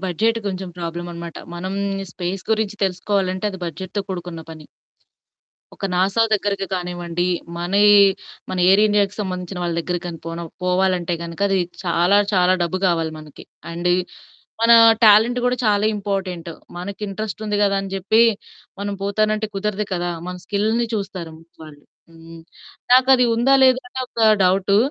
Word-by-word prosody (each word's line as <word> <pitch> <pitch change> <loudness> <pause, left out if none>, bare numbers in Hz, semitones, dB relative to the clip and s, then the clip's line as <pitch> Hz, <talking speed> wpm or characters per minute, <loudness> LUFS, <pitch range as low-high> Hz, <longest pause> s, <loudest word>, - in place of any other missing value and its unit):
Budget 220 +6 0
కొంచెం 190 -1 -4
ప్రాబ్లమనమాట. 170 0 -6 0.2
మనం 185 +3 -5 0.4
space 185 +1 -4
గురించి 215 -1 0
తెలుసుకోవాలంటే 185 0 -1
అది 190 - -8
బడ్జెట్‌తో 185 +4 -5
కూడుకున్న 175 -3 -6
పని. 155 -2 -11 1.1
ఒక - - -4
నాసా 195 +5 +2
దగ్గరకి 200 -1 -1
కానివ్వండి 175 -1 -3 0.3
మనయి, 200 +4 +4 0.6
మన 185 - -3
ఎయిర్ 195 +2 +6
ఇండియాకి 205 -1 +1
సంబంధించిన 185 -1 -5
వాళ్ళ 170 -1 -2
దగ్గరకి 175 +1 -4
గాని 165 -1 -7
పోనవ్ 165 0 -6
పోవాలంటే 180 -1 +1
గనక 170 +2 -8
అది 195 - +1 0.3
చాలా, 175 +3 +3
చాలా 185 -1 +4
డబ్బు 170 +2 -1
గావాలి 165 -3 0
మనకి. 155 -2 -13 0.3
అండ్ 175 +1 -1 0.7
మన 235 - +6 0.3
టాలెంట్ 220 +3 +6
గూడా 250 0 +1
చాలా 210 0 +2
ఇంపార్టెంటు 190 -4 -4 0.2
మనకి. 195 +3 -7
ఇంట్రెస్ట్ 215 +2 -5
ఉంది 210 -1 -1
గదా 200 -1 +2
అని 195 0 -7
జెప్పి, 205 +4 +3 0.6
మనం 205 0 -3
పోతానంటే 215 +2 0
కుదరదు 210 +1 -2
కదా! 175 0 -2 0.2
మన 180 - -5
స్కిల్‌ని 215 +4 0
చూస్తారు 190 -5 -5
ముందు 165 +1 -20
వాళ్ళు. 145 -2 -14 0.3
హ్మ్. 165 0 -13 0.5
నాకది 255 -1 +6
ఉందా? 250 +4 +3
లేదా? 260 0 +4
అని 260 - -6
ఒక 225 -2 +2 0.2
డౌటు. 190 +2 +2
190 Hz, 145 wpm, -21 LUFS, 175-205 Hz, 1.1 s, ఎయిర్